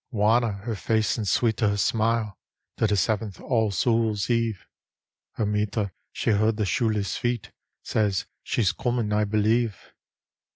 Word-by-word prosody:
Wanner 115 0 +2
her 115 0 -2
face 110 +1 +1
and 105 - -2
sweeter 110 +3 +2
her 100 - 0 0.2
anile, 115 -1 0 0.4
Till 110 - +1
the 105 -1 +1
seventh 105 -2 -1
All 110 -4 +1
Souls 110 +1 +1
Eve 115 -4 0 0.7
Her 110 - -1
mither 105 0 -1 0.2
she - - 0
heard 110 +1 +2
the 105 - 0
shoeless 105 -1 0
feet, 120 -3 -2 0.3
Says 100 -3 0
" - - -55
She's 105 -7 +1
comin', 120 -4 -1
I 105 0 +2
believe." 110 +1 +1
110 Hz, 150 wpm, -25 LUFS, 105-115 Hz, 0.7 s, Wanner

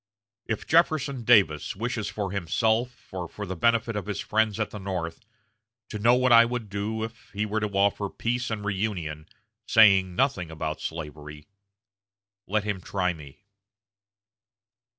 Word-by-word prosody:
If 110 -2 -3
Jefferson 155 -6 +2
Davis 95 -11 +4
wishes 110 0 -3
for 100 -3 -4
himself, 110 +7 -1
or 90 -2 -4
for 105 - -6
the 95 -1 -5
benefit 115 +4 +1
of 105 -1 -4
his 100 -1 -3
friends 110 0 0
at 110 - -1
the 105 - -7
North, 90 -4 -4 0.7
to 105 - -5
know 120 +4 +5
what 130 0 +2
I 115 0 +9
would 115 -3 -4
do 105 +2 -2
if 115 0 -8
he 105 +1 -1
were 105 +1 -1
to 105 - -1
offer 100 0 +1
peace 120 +4 -2
and 105 -2 -4
reunion, 95 -7 -3 0.4
saying 95 -5 +5
nothing 95 - 0
about 80 -1 -4
slavery, 75 -2 -7 1.0
let 105 +1 0
him 100 -3 -3
try 90 -1 -1
me." 75 -4 -13
105 Hz, 150 wpm, -26 LUFS, 90-115 Hz, 1.0 s, I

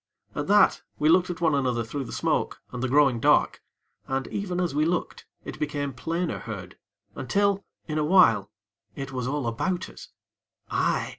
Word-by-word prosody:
At - - -3
that 205 -1 +5 0.2
we 155 - +2
looked 180 +2 +4
at 175 0 -5
one 160 -3 +3
another 125 -4 +1
through 135 +5 -5
the - - -9
smoke - - -1
and 125 - -5
the 130 - -1
growing 135 -3 +4
dark, - - +3 0.5
and, 135 0 -1
even 185 -3 -3
as 175 -5 0
we 150 +1 +2
looked, 170 +2 -2 0.2
it - - -7
became 145 -2 -2
plainer 165 +7 -2
heard, 100 -5 -7 0.4
until, 200 - 0 0.2
in 155 -1 -1
a - - +1
while, 130 - +5 0.5
it 135 -1 -6
was 125 -1 -3
all 145 -1 -2
about 175 - -2
us - - -12 0.6
aye! - - +1
145 Hz, 175 wpm, -26 LUFS, 125-175 Hz, 0.6 s, that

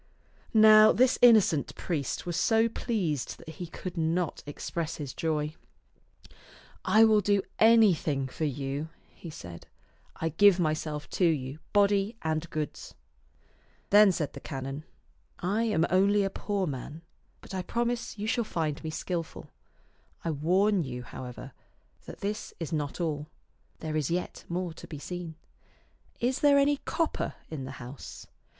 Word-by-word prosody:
Now 215 0 +8
this 255 +1 +3
innocent 215 - +5
priest 150 -7 -3
was 175 -1 -3
so 225 +4 +3
pleased 190 - -2
that - - -12
he 170 +2 -7
could 180 +2 -7
not 165 +1 0
express 160 +2 -4
his 140 -4 -6
joy. 155 -2 -1 0.7
" - - -21 0.5
I 220 +1 +5
will 215 -1 +4
do 200 0 +2 0.2
anything 185 -12 +4
for 155 +4 -3
you," 140 +2 -3 0.2
he 170 - -10
said. 85 - -10 0.3
" - - -36
I 165 - -2
give 190 +3 +5
myself 155 -2 -1
to 185 - +2
you, 145 -3 0
body 205 +2 +2
and 160 +1 -1
goods." 155 -1 -5 1.0
Then 205 -1 +8
said 160 -5 -3
the - - -8
canon, 135 +1 -6 0.3
" - - -39 0.2
I 230 - +2
am 195 -7 +2
only 200 +2 +4
a 195 - -1
poor 200 -1 -2
man, 145 +2 -6 0.4
but - - -12
I 190 - -1
promise 235 +4 -2
you 205 - -4
shall 235 +2 +1
find 160 -6 -3
me 160 - -3
skillful. 165 +1 -5 0.7
I 165 - +1
warn 185 +6 +2
you, 125 -3 -6
how 130 - -8
ever, 125 -1 -9 0.6
that - - -10
this 210 +2 -4
is 165 -1 -4
not 150 0 -2
all; 155 -3 -2 0.5
there 155 -1 -3
is 150 -3 0
yet 175 +2 -3
more 175 -1 -2
to - - -11
be 155 - -7
seen. 170 +2 -6 0.8
Is 255 +2 0
there 285 -1 +5
any 285 +1 +3
copper 330 -2 -1 0.2
in 140 -4 -5
the 130 - -7
house?" 125 +3 -9
170 Hz, 155 wpm, -29 LUFS, 150-205 Hz, 1.0 s, Now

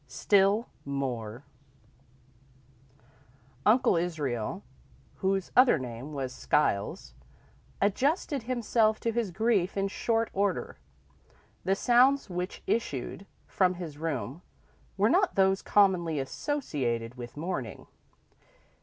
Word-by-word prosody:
X 130 - -13
Still 200 +3 +3 0.2
More 125 -4 -4 2.2
Uncle 235 -3 +4
Israel, 145 -10 -2 0.5
whose 190 -1 -1
other 255 -7 +6
name 125 +2 -7
was 135 -3 -4
Skiles, 130 -6 0 0.7
adjusted 275 - +1
himself 225 -2 +1
to 230 - 0
his 230 -3 -1
grief 200 -1 +1
in 195 0 +1
short 225 +3 -1
order. 195 - -1 0.9
The 195 - +2
sounds 250 +1 +3
which 180 +1 -4
issued 195 - -2 0.2
from 185 -1 +1
his 160 -5 -7
room 145 - -3 0.6
were 200 +2 +4
not 375 - +2
those 190 0 +3
commonly 180 -6 +3
associated 130 - -2
with 120 +1 -9
mourning. 150 -7 -4
185 Hz, 100 wpm, -29 LUFS, 140-220 Hz, 2.2 s, other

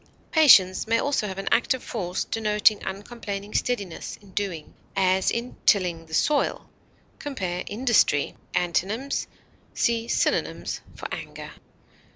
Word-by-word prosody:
Patience 220 - +6
may 230 +1 +3
also 270 -4 0
have 190 -1 -6
an 195 - -5
active 245 +2 +2
force 185 -5 -3
denoting 210 -1 +2
uncomplaining 205 0 -6
steadiness 200 -9 -2
in 200 -2 -18
doing, 185 -6 -4 0.2
as 190 -1 +3
in 235 +2 -3
tilling 175 -5 +2
the 160 - -13
soil. 295 - +1 0.5
Compare 185 -11 -3
INDUSTRY. 215 - +2 0.2
Antonyms: 200 +10 -1 0.5
See 230 -1 +1
synonyms - - -1
for - - -6
ANGER. - - -7
205 Hz, 120 wpm, -25 LUFS, 185-235 Hz, 0.5 s, Patience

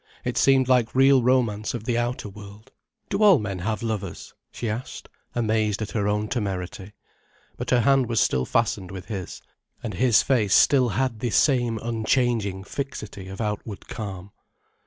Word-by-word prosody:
It - - -2
seemed 135 -2 +4
like 125 -3 +2
real 135 0 +6
romance 120 -4 +1
of 115 - -5
the 120 +1 -1
outer 120 -1 -2
world. 105 +1 -12 0.4
"Do 195 +1 0
all 205 -5 +7
men 100 -5 -4
have 110 +5 -3
lovers?" 105 -6 -4 0.2
she 120 - -5
asked, 110 +4 -5 0.3
amazed 110 -3 0
at 110 -1 -4
her 105 -3 -1
own 105 +1 0
temerity. 100 -3 -4 0.6
But - - -5
her 125 -1 +4
hand 135 0 +3
was 115 - +1
still 65 -1 +2
fastened 105 -5 0
with 95 +2 -9
his, 95 -5 -6 0.4
and 110 -4 -4
his 120 +3 +4
face 110 -7 +2
still 130 -4 +5
had 130 -4 0
the 120 - -1
same 120 -2 +2
unchanging 115 -3 0
fixity 105 -5 -6
of 95 +1 -8
outward 105 -2 -4
calm. 100 -3 -6
110 Hz, 165 wpm, -24 LUFS, 100-125 Hz, 0.6 s, all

